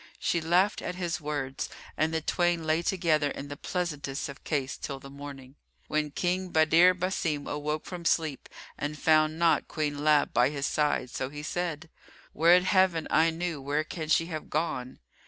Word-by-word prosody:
She 170 - 0
laughed 180 +5 +2
at 180 - -4
his 175 -3 -3
words 145 -3 -3 0.3
and 160 +1 +1
the 160 0 -1
twain 175 +1 +1
lay 155 +1 +2
together 165 -5 +1
in 140 0 -6
the 145 - -5
pleasantest 150 -5 -3
of 140 - -10
case 140 -3 -1
till 140 -2 -6
the 135 0 -11
morning, 140 -1 -10 0.3
when 150 0 0
King 180 +4 -1
Badr 165 +2 +5
Basim 180 -5 -2
awoke 150 +1 -3
from 180 -2 -7
sleep 160 -4 0 0.3
and 150 +1 -3
found 155 0 +3
not 170 0 +3
Queen 145 -2 -2
Lab 150 -1 +3
by 125 +2 +4
his 140 -1 -3
side, 145 -5 0
so 130 - -3
he 150 +1 -8
said, 170 0 -3 0.5
"Would 170 +4 +5
Heaven 185 -4 +3
I 160 +1 +5
knew 165 -2 -3
where 145 +3 0
can 155 0 -6
she 165 +1 +4
have 160 -3 -6
gone!" 145 -5 -2
155 Hz, 175 wpm, -28 LUFS, 145-170 Hz, 0.5 s, Badr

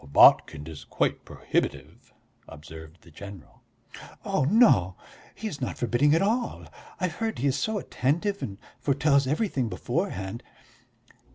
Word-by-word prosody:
"Botkin 70 +1 +5
is 80 -2 -9
quite - - -1
prohibitive," - - -3 0.4
observed 80 +2 -12
the 85 - -17
general. 100 0 -12 0.6
"Oh, - - +1
no, 140 - +4 0.4
he 220 - -5
is 150 -10 -7
not 130 - -3
forbidding 135 +5 +2
at 165 - +2
all; 230 +4 -1 0.3
I've 180 -3 -2
heard 225 -1 -2
he 130 - -2
is 135 - +1
so 220 -1 -1
attentive 180 +5 -1
and 100 -2 -5 0.2
foretells 140 -1 +2
everything 140 - 0
beforehand." 95 +2 -3
130 Hz, 130 wpm, -26 LUFS, -, 0.6 s, Botkin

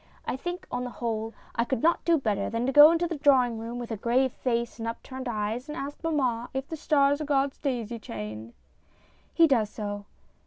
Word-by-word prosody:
I - - -2
think, 350 +7 -5
on 245 0 -2
the 250 - -4
whole, 225 -2 -3 0.2
I 235 - +1
could 240 -1 -2
not 335 +1 +3
do 335 -1 +4
better 210 -7 -1
than 230 +2 -1
go 295 +3 +10
into 335 +1 +2
the 330 -2 -4
draw 280 -3 +5
ing 230 -2 -5
room 230 +2 -5
with 240 -1 -6
a 225 - -2
grave 245 +5 +2
face 235 -1 -2
and 225 - -3
upturned 260 +3 -6
eyes 225 +5 -3
and 300 - -5
ask 280 +3 -6
mamma 255 -7 0
if 265 +1 -2
the 320 - -5
stars 285 -1 +2
are - - -2
God's 275 -1 0
daisy 240 -5 -3
chain. 110 - -7 0.8
[He 335 - +5
does 235 -9 +2
so. 205 -1 -5
245 Hz, 210 wpm, -27 LUFS, 225-285 Hz, 0.8 s, go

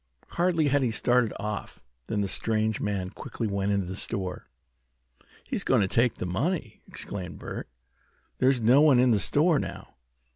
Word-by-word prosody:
Hardly 170 -4 +1
had 145 +1 +3
he 125 - +1
started 120 0 +2
off 105 -1 -5 0.3
than 105 - -1
the 100 - 0
strange 110 +1 0
man 95 -3 -2
quickly 115 - -5
went 100 -1 -1
into 100 -2 +1
the 95 +2 -5
store. 95 -3 -3 1.0
"He's - - -3
going - - +3
to 95 - +2
take 120 +4 +2
the - - -4
money!" 125 - -2
exclaimed 95 -3 -6
Bert. - - -7 0.7
"There's 130 0 +3
no 125 +6 +6
one 150 -4 +6
in 125 0 +4
the 105 - +3
store 150 - +3
now. - - -7
110 Hz, 170 wpm, -27 LUFS, 100-130 Hz, 1.0 s, no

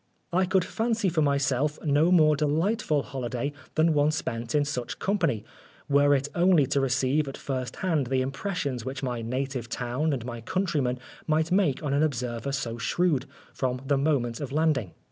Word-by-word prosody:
I 185 +1 +3
could 185 -1 +2
fancy 225 -2 0
for 165 -2 +1
myself 140 0 +1
no 150 +4 +3
more 155 -4 +5
delightful 155 +2 +1
holiday 130 +1 -3 0.2
than 160 +1 +4
one 145 0 +3
spent 120 -6 -3
in 145 -1 +3
such 130 -5 -4
company, 165 - 0 0.4
were 145 0 +4
it 140 +1 -1
only 175 -4 +4
to 140 +2 +1
receive 135 +3 +1
at 135 - -6
first 130 -3 -4
hand 160 -8 0
the 130 +1 +1
impressions 140 - -3
which 130 +2 -5
my 125 -3 -2
native 130 +1 -3
town 125 +6 -1
and 125 -5 -3
my 120 -2 -6
countrymen 145 - 0 0.3
might 160 +1 +1
make 180 -7 +2
on 140 -2 -1
an 140 - +2
observer 125 -3 -1
so 120 -4 -3
shrewd, 145 -1 +1 0.3
from 125 -1 -1
the 140 +1 +2
moment 135 -6 0
of 140 - -4
landing. 145 - +1
140 Hz, 175 wpm, -27 LUFS, 130-155 Hz, 0.4 s, more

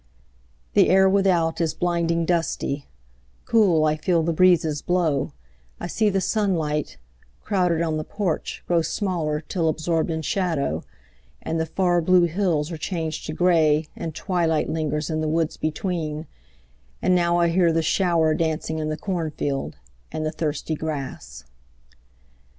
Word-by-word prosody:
The - - +5
air 190 +1 +6
without 185 -4 +2
is 160 -2 0
blinding 170 -1 0
dusty; 160 -4 -1 0.6
Cool 185 -9 +4
I 155 0 +2
feel 165 +1 +1
the 165 +1 0
breezes 160 -4 +3
blow; 175 -5 0 0.5
I - - -5
see 210 +5 +1
The 195 -1 +1
sunlight, 175 -8 -1 0.5
crowded 180 -4 +1
on 160 -2 -1
the 155 - -2
porch, 200 -2 -3
grow 170 -1 +2
Smaller 165 -3 -1
till 165 0 -1
absorbed 160 +1 0
in 160 -1 -2
shadow; 160 - -1 0.6
and 165 - -2
The 160 - -1
far 175 +1 +1
blue 180 +1 +4
hills 170 -3 0
are 165 - -4
changed 160 -1 -4
to 155 - -3
gray, 160 -3 +3
and 160 -2 -5
Twilight 170 -5 0
lingers 155 0 -2
in 155 0 -1
the 155 - -1
woods 160 0 0
between; 155 -2 -3 0.7
And 185 - +2
now 175 -1 +3
I 170 -1 +3
hear 170 0 +3
the 165 0 +1
shower 165 -2 +2
dancing 160 0 -1
In 155 0 -2
the 155 - -2
cornfield 155 -6 -3 0.4
and 155 - -3
the 155 - -1
thirsty 155 0 -3
grass. 135 - -5
165 Hz, 150 wpm, -23 LUFS, 155-180 Hz, 0.7 s, air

